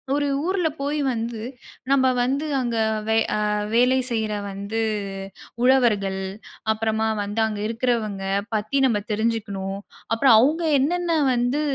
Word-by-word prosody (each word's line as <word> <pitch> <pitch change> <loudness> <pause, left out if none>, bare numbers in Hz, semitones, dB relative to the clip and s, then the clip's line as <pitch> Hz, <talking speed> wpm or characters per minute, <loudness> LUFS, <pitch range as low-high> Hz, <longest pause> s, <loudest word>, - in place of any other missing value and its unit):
ஒரு 290 0 0 0.2
ஊர்ல 370 -3 +1
போய் 295 +2 -1
வந்து 230 0 -4 0.5
நம்ப 260 -1 +4
வந்து 275 +5 0
அங்க 240 -2 -2 0.3
வை 220 - +3 0.2
அ - - -1 0.3
வேலை 250 +2 +4
செய்ற 220 -2 -1 0.2
வந்து 200 +3 -3 0.8
உழவர்கள், 210 -7 +3 0.5
அப்புறமா 220 0 -1 0.2
வந்து 205 +2 -4
அங்க 210 -1 -4
இருக்குறவங்க 225 -4 -1 0.3
பத்தி 215 +6 -1
நம்ம 210 -4 +1
தெரிஞ்சுக்கணும். 205 -3 -2 0.4
அப்புறம் 230 0 +5
அவுங்க 310 +8 +2 0.2
என்னென்னா 340 +3 +1 0.2
வந்து, 245 +4 0
230 Hz, 125 wpm, -23 LUFS, 215-265 Hz, 0.8 s, அப்புறம்